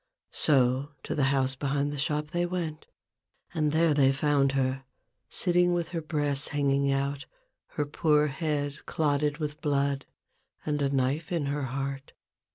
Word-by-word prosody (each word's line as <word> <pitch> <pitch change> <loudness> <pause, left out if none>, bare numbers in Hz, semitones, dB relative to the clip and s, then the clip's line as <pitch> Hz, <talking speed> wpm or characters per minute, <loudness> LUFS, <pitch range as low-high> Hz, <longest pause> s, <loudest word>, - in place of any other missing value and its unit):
So 135 0 +2
to - - -3
the 140 - +2
house 135 -1 +2
behind 140 +1 -1
the 145 - -5
shop 150 +1 0
they 175 0 0
went, 170 -4 -4 0.7
and 155 -3 +1
there 160 0 +3
they 135 -2 +4
found 140 0 +2
her 135 0 0 0.2
— - - -51
sitting 175 -1 +3
with 170 -2 -2
her 170 -2 -3
breasts 145 -3 -1
hanging 140 -1 +1
out, 140 +1 -1 0.5
her 150 - +1
poor 150 +1 +2
head 145 -1 -3
clotted 150 -1 +1
with 150 -1 -4
blood, 140 -2 0 0.6
and 150 -1 -1
a 140 - +2
knife 140 +4 0
in 165 -4 0
her 140 0 -1
heart. 135 +1 -4
145 Hz, 160 wpm, -28 LUFS, 135-155 Hz, 0.7 s, they